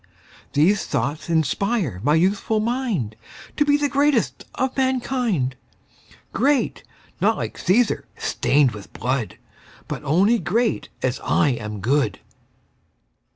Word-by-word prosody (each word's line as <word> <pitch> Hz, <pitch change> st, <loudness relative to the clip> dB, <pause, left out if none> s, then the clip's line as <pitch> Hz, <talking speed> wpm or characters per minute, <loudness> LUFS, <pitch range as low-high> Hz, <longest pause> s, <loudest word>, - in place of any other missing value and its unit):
These 185 Hz, +8 st, +3 dB
thoughts 155 Hz, +3 st, -2 dB
inspire 165 Hz, -, 0 dB
my 145 Hz, +6 st, +3 dB
youthful 200 Hz, +5 st, +1 dB
mind 220 Hz, -, -1 dB, 0.4 s
To 295 Hz, -, +3 dB
be 290 Hz, 0 st, +3 dB
the 290 Hz, 0 st, +1 dB
greatest 280 Hz, -3 st, +1 dB
of 260 Hz, 0 st, -1 dB
mankind: 250 Hz, -, 0 dB, 0.8 s
Great, 275 Hz, +3 st, +1 dB, 0.4 s
not -, -, +3 dB
like -, -, -4 dB
Cæsar, 225 Hz, +4 st, +1 dB
stained 140 Hz, -2 st, +2 dB
with 105 Hz, -2 st, -10 dB
blood, 125 Hz, -1 st, -2 dB, 0.5 s
But -, -, -5 dB
only 190 Hz, +11 st, +3 dB
great 230 Hz, +5 st, 0 dB
as 130 Hz, 0 st, 0 dB
I 145 Hz, -, +3 dB
am 105 Hz, -5 st, -4 dB
good. 140 Hz, +7 st, +1 dB
185 Hz, 115 wpm, -22 LUFS, -, 0.8 s, These